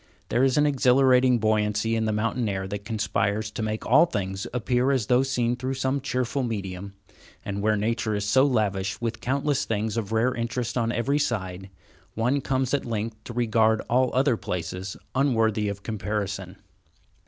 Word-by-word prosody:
There 120 - +2
is 135 0 +3
an 150 - +4
exhilarating 130 -2 +4
buoyancy 110 0 +1
in 110 0 0
the 110 - 0
mountain 110 +2 -1
air 95 -1 -3
that 100 +1 -5
conspires 105 0 -1
to 110 - -5
make 110 0 -3
all 135 +8 +5
things 95 - -3
appear 125 +1 +1
as 130 -6 +1
though 125 +3 +4
seen 125 -3 0
through 130 +2 -3
some 130 +1 -1
cheerful 130 0 -1
medium, 100 -4 -4 0.5
and 100 0 -3
where 105 +1 +2
nature 110 0 -1
is 105 0 -2
so 130 +6 +4
lavish 105 -7 0
with 115 -1 -3
countless 140 +2 0
things 110 0 -2
of 110 -3 -3
rare 115 +3 +2
interest 120 0 -3
on 115 -2 +1
every 130 +5 0
side, 95 -8 -2 0.5
one 125 +5 +1
comes 130 -1 -1
at 145 - +1
length 110 -1 -4
to 120 - -7
regard 110 -2 +2
all 130 +1 +3
other 130 -2 +3
places 95 -1 -4 0.2
unworthy 110 -6 +2
of 100 0 -6
comparison. 100 -3 -3
115 Hz, 175 wpm, -25 LUFS, 105-125 Hz, 0.5 s, all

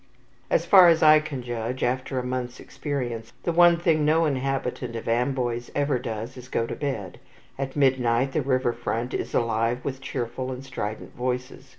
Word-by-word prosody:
As 170 - +2
far 185 0 +8
as 165 -2 +4
I 155 0 +8
can 145 -4 -6
judge, 120 +1 -3
after 130 +2 -1
a 125 - -1
month's 125 0 -4
experience, 120 -6 -5
the 170 - 0
one 170 0 +6
thing 165 -3 +2
no 160 +2 +3
inhabitant 135 -3 -2
of 115 - -6
Amboise 120 0 0
ever 140 -3 +1
does 115 +1 -5
is 125 - -9
to - - -18
go 115 - 0
to - - -5
bed. 120 -11 -4 0.4
At 135 -1 -3
midnight 130 -2 +2
the 155 - 0
river 130 -3 +1
front 120 +1 -3
is - - -3
alive 115 +2 0
with 135 -1 -4
cheerful 130 0 -4
and 130 +1 -7
strident 110 -5 -5
voices. 125 +2 -4
130 Hz, 185 wpm, -25 LUFS, 120-140 Hz, 0.4 s, far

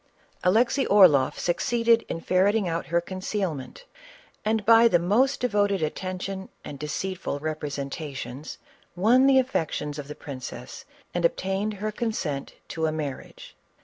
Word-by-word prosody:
Alexey 235 +8 +3
Orloff 165 -10 +5
succeeded 230 +6 +2
in 165 - -4
ferreting 195 +3 +2
out 165 0 -2
her 170 +1 +2
concealment, 185 - -4 0.6
and, 215 -1 0
by 230 +1 +7
the 180 - +4
most 215 +11 +2
devoted 205 -6 +1
attention 185 +4 -4 0.2
and 140 - -8
deceitful 150 +2 -3
representations, 145 -2 -5 0.4
won 240 +8 +4
the 270 -1 +5
affections 155 - -1
of 140 - -7
the 150 - -7
princess 130 -3 -8 0.3
and 175 - -1
obtained 195 +5 0
her 215 +2 -3
con 225 +2 -2
sent 145 -9 -4 0.2
to 160 -1 -1
a - - 0
marriage. 150 -4 -6
185 Hz, 135 wpm, -26 LUFS, 150-215 Hz, 0.6 s, by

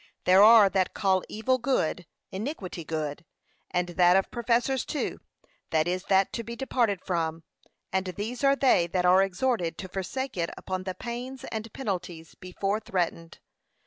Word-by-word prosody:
There 185 +2 +6
are 220 -1 +8
that 190 -1 0
call 190 -2 +2
evil 255 +4 0
good, 185 - -1 0.2
iniquity 190 - -5
good, 155 0 -4 0.5
and 180 0 -1
that 175 +1 +4
of 195 - 0
professors 240 +2 +1
too: 300 - -3 0.5
this 155 -1 +2
is 180 +1 -2
that 195 0 +2
to 230 - -3
be 235 +1 -7
departed 235 -6 0
from, 165 -2 -2 0.5
and 190 0 0
these 215 +8 -5
are 275 0 +5
they 255 -11 +3
that 180 +1 -1
are 185 +1 +6
exhorted 195 -3 0
to 190 - -6
forsake 195 +7 -4
it 170 -1 0
upon 185 0 -4
the 185 -1 -4
pains 250 +2 -6
and 220 0 -5
penalties 180 -9 -5
before 195 +3 -3
threatened. 175 -5 -3
190 Hz, 160 wpm, -27 LUFS, 180-235 Hz, 0.5 s, are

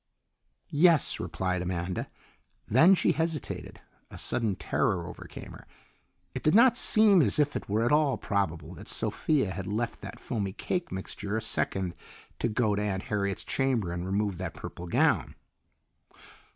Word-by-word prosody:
"Yes," 160 -1 +4
replied 90 +1 -2
Amanda. 90 0 -3 0.6
Then 165 - +6
she - - +2
hesitated. 160 -2 -3 0.3
A - - -10
sudden 110 -5 0
terror 90 -2 0
overcame 90 - -9
her. - - -13 0.7
It - - -4
did 155 - +3
not 240 +1 +7
seem 215 -6 +5
as 105 -9 +2
if 145 -1 +2
it - - -5
were 110 +3 +1
at 120 - +1
all 150 -2 +3
probable 85 -6 -2
that - - -11
Sophia 135 -11 0
had 95 -1 -5
left 115 +4 -3
that 100 0 -8
foamy 100 -6 -3
cake 180 - -3
mixture 100 +2 -4
a - - 0
second 95 -3 -1 0.5
to - - +1
go 110 -1 +1
to 100 - -1
Aunt 95 -2 -2
Harriet's 100 -2 -2
chamber 125 -9 0
and 85 0 -4
remove 100 0 -1
that 95 -2 -5
purple 90 - -8
gown. - - +2
105 Hz, 155 wpm, -28 LUFS, 95-145 Hz, 0.7 s, not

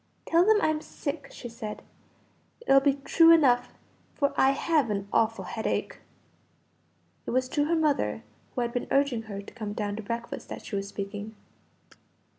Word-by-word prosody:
"Tell 335 +1 +4
them 435 +2 +5
I'm 310 -1 +1
sick," 285 -1 -5
she 245 - -9
said, 225 -2 -7 0.8
"it'll 275 -12 +5
be 275 0 +2
true 330 +4 +6
enough, 270 -7 +4 0.4
for 280 -1 +1
I 265 - +5
have 285 -2 +1
an 200 -1 -2
awful 225 0 +1
headache." - - -3 1.3
It - - -2
was 255 +1 +1
to 290 0 +1
her 335 +2 +1
mother 305 -3 +1 0.3
who 250 - 0
had 235 0 -2
been 245 - -2
urging 275 -4 +2
her 200 -3 -7
to - - -13
come 215 -4 -5
down 205 -1 -3
to - - -4
breakfast, 230 +2 -5
that - - -7
she 210 - -5
was 195 0 -2
speaking. 205 +2 -6
250 Hz, 170 wpm, -27 LUFS, 215-290 Hz, 1.3 s, true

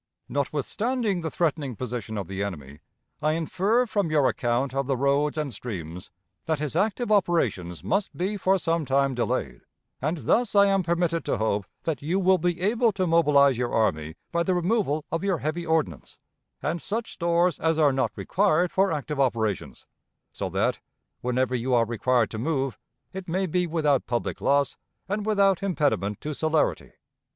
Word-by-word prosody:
Notwithstanding 195 - -1
the 160 - -2
threatening 150 -6 -1
position 115 -2 -5
of 100 - -4
the 95 0 -4
enemy, 75 -8 -5 0.4
I 155 +1 +2
infer 190 +9 +1
from 205 -6 -1
your 150 -4 +3
account 120 +3 0
of 135 -1 -1
the 135 -2 0
roads 140 +3 +1
and 150 -4 -2
streams 90 -7 -7 0.4
that 160 -1 0
his 150 0 -3
active 215 +5 0
operations 110 - +1
must 195 +1 -1
be 190 +4 -1
for 190 -1 +2
some 165 -2 0
time 135 0 +1
delayed, 120 - -2 0.4
and 155 +6 -1
thus 235 -3 +1
I 200 0 +7
am 195 -1 +3
permitted 170 -1 0
to - - 0
hope 105 -2 -1 0.2
that 155 -6 -2
you 170 +7 0
will 190 -1 +4
be 175 +1 0
able 225 +4 +2
to 185 -1 0
mobilize 145 -6 +4
your 120 -1 -1
army 80 -8 0 0.2
by 170 - +1
the 185 +1 +1
removal 175 -5 0
of 165 +2 -2
your 195 -3 +1
heavy 160 +3 -3
ordnance 125 - -1 0.5
and 160 +3 -1
such 225 +2 -3
stores 170 0 +1
as 160 -1 +1
are 150 -3 +4
not 130 - 0
required 180 -2 +1
for 195 +1 +2
active 150 -1 -3
operations, 110 -7 -1 0.5
so - - -3
that, - - 0 0.4
whenever 125 +1 0
you 125 +1 +1
are 115 -1 +4
required 120 +1 +1
to 110 - -5
move, 135 -1 -1 0.4
it 190 -1 -7
may 190 +3 0
be 180 +1 0
without 150 -5 +1
public 120 -1 -2
loss 140 -1 +2 0.3
and 205 +2 -2
without 200 -3 +3
impediment 145 - 0
to 150 - -4
celerity. 155 +1 0
155 Hz, 175 wpm, -26 LUFS, 125-180 Hz, 0.5 s, I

